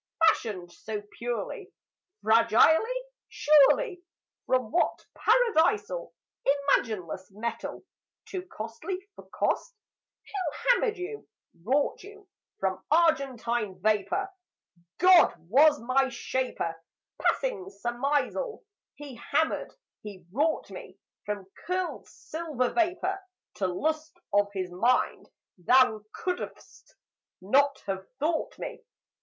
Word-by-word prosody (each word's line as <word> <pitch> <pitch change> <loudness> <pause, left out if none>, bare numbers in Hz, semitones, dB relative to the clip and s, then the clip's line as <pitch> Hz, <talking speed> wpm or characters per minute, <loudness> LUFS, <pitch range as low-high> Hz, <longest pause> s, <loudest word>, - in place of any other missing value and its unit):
Fashioned 185 - +1
so 210 +3 -6 0.2
purely, 245 - -4 0.5
Fragilely, 275 - +4 0.3
surely, 305 - +4 0.5
From 255 -4 +1
what 350 - +1
Paradisal 435 0 +2 0.3
Imagineless 220 - 0
metal, 215 +4 -5 0.4
Too 370 - -5
costly 315 - -6 0.2
for - - -14
cost? - - -1 0.5
Who 370 -7 -4
hammered 455 -3 +2
you, 390 +4 -6 0.4
wrought 275 +7 +1
you, 410 0 -13 0.3
From 190 -1 -1
argentine 250 - +1
vapour? 215 - +1 0.7
"God 365 -1 +6
was 290 - +5
my 260 +3 +2
shaper. 240 -9 -3 0.4
Passing 480 -7 0
surmisal, 285 - -2 0.3
He 285 -4 -10
hammered, 320 +6 0 0.3
He 195 -4 -10
wrought 300 +8 0
me, - - -10 0.3
From 205 -2 -3 0.2
curled 365 0 -2
silver 305 -6 -3
vapour, 360 +2 0 0.4
To 190 - +1
lust 310 - -2
of 205 0 +4
His 185 -3 -4
mind: 235 +8 +1 0.3
Thou 220 +2 +4
could'st 360 -1 -6 0.4
not 270 +8 +2
have 190 -1 -4
thought 315 +3 -1
me! - - -6
275 Hz, 100 wpm, -28 LUFS, 220-360 Hz, 0.7 s, God